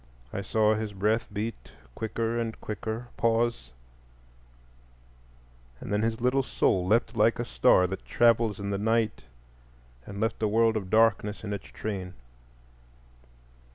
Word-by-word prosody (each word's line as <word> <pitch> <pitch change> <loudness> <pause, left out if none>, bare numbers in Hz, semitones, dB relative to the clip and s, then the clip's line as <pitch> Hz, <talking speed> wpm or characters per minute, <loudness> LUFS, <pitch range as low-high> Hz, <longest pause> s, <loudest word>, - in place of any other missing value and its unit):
I 100 - -2
saw 110 +2 +2
his 110 -1 -3
breath 105 +4 0
beat 100 - -5 0.2
quicker 115 - -2
and 115 -1 -4
quicker, 110 +3 -5
pause, 115 - 0 2.1
and 100 - -5
then 105 - +2
his 115 0 -1
little 125 +3 +2
soul 95 -7 +1
leapt 115 +3 +2
like 110 +1 +3
a 120 - -2
star 90 - +4
that 95 +1 -5
travels 115 -3 +2
in 100 0 -3
the 100 - -1
night 110 +1 0 0.8
and 100 - -7
left 110 +1 -1
a 110 - +2
world 115 +1 +3
of 100 -4 -3
darkness 110 -1 +2
in 105 -1 -3
its 100 - -6
train. 95 -4 -5
110 Hz, 140 wpm, -28 LUFS, 100-115 Hz, 2.1 s, star